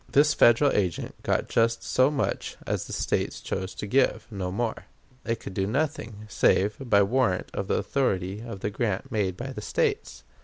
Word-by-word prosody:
This 150 Hz, +1 st, +5 dB
Federal 120 Hz, +5 st, +5 dB
agent 90 Hz, -5 st, -1 dB
got -, -, 0 dB
just 115 Hz, 0 st, +1 dB
so 130 Hz, +2 st, +3 dB
much 145 Hz, -2 st, -2 dB
as -, -, -2 dB
the -, -, -9 dB
States -, -, -1 dB
chose 95 Hz, +1 st, -4 dB
to -, -, -5 dB
give 130 Hz, +6 st, +2 dB
no 95 Hz, -3 st, -3 dB
more. 115 Hz, +3 st, -2 dB, 0.4 s
It 115 Hz, -1 st, -1 dB
could -, -, -8 dB
do 95 Hz, +1 st, -1 dB
nothing 115 Hz, -5 st, -2 dB
save 105 Hz, 0 st, +2 dB
by 110 Hz, -7 st, +4 dB
warrant 105 Hz, -3 st, +1 dB
of 100 Hz, -, -3 dB
the -, -, +1 dB
authority 100 Hz, -7 st, -1 dB
of 115 Hz, -5 st, -7 dB
the 105 Hz, -, -2 dB
grant 105 Hz, -3 st, -2 dB
made 95 Hz, -4 st, 0 dB
by 130 Hz, +2 st, -5 dB
the 130 Hz, -, -6 dB
States. 460 Hz, -3 st, -1 dB
110 Hz, 185 wpm, -26 LUFS, 100-130 Hz, 0.4 s, This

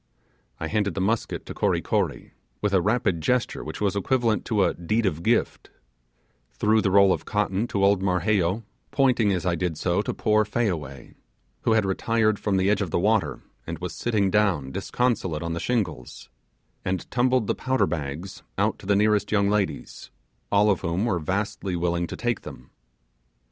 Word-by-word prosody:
I -, -, -3 dB
handed 100 Hz, +1 st, -1 dB
the -, -, -2 dB
musket 105 Hz, +4 st, -1 dB
to -, -, -7 dB
Kory -, -, +1 dB
Kory, -, -, -2 dB, 0.3 s
with 105 Hz, -1 st, -1 dB
a 95 Hz, -, +4 dB
rapid 105 Hz, -4 st, +1 dB
gesture 125 Hz, +8 st, 0 dB
which 80 Hz, -, -7 dB
was 100 Hz, -2 st, 0 dB
equivalent 115 Hz, +1 st, +1 dB
to 105 Hz, -3 st, +2 dB
a -, -, +2 dB
'Deed 105 Hz, +7 st, -1 dB
of 80 Hz, -4 st, -1 dB
Gift'; 115 Hz, +6 st, 0 dB, 0.8 s
threw 110 Hz, +1 st, +2 dB
the 100 Hz, -, +1 dB
roll 100 Hz, 0 st, +5 dB
of -, -, -4 dB
cotton 105 Hz, +1 st, 0 dB
to 100 Hz, -3 st, +1 dB
old 100 Hz, -1 st, +3 dB
Marheyo, 95 Hz, +2 st, +1 dB, 0.3 s
pointing 125 Hz, -6 st, +2 dB
as 95 Hz, -1 st, -1 dB
I 90 Hz, -, +2 dB
did 85 Hz, -2 st, -2 dB
so 90 Hz, +4 st, +1 dB
to -, -, -3 dB
poor 110 Hz, 0 st, +2 dB
Fayaway, 90 Hz, -, -3 dB, 0.5 s
who 115 Hz, -, +4 dB
had 110 Hz, -2 st, +3 dB
retired 110 Hz, +2 st, +1 dB
from 100 Hz, -2 st, 0 dB
the 95 Hz, 0 st, +2 dB
edge 105 Hz, 0 st, +2 dB
of 95 Hz, -, -2 dB
the -, -, 0 dB
water 95 Hz, -, +1 dB, 0.2 s
and 85 Hz, 0 st, -4 dB
was 90 Hz, +2 st, -5 dB
sitting 105 Hz, -5 st, 0 dB
down 90 Hz, -11 st, +1 dB
disconsolate 95 Hz, -, -1 dB
on 85 Hz, 0 st, -3 dB
the 85 Hz, -, -3 dB
shingles; 85 Hz, -, -3 dB, 0.5 s
and 90 Hz, -1 st, -2 dB
tumbled 125 Hz, -1 st, +2 dB
the -, -, 0 dB
powder 130 Hz, 0 st, +1 dB
bags 80 Hz, +3 st, -5 dB, 0.2 s
out -, -, +1 dB
to -, -, -11 dB
the 100 Hz, -, +3 dB
nearest 105 Hz, 0 st, +2 dB
young 100 Hz, -1 st, +2 dB
ladies, 105 Hz, -2 st, -2 dB, 0.4 s
all 105 Hz, +1 st, +4 dB
of 95 Hz, -, -1 dB
whom 85 Hz, +6 st, -1 dB
were 100 Hz, -7 st, 0 dB
vastly 95 Hz, +2 st, -2 dB
willing 85 Hz, 0 st, 0 dB
to -, -, -6 dB
take 120 Hz, -2 st, -1 dB
them. 65 Hz, -, -11 dB
100 Hz, 185 wpm, -25 LUFS, 90-110 Hz, 0.8 s, roll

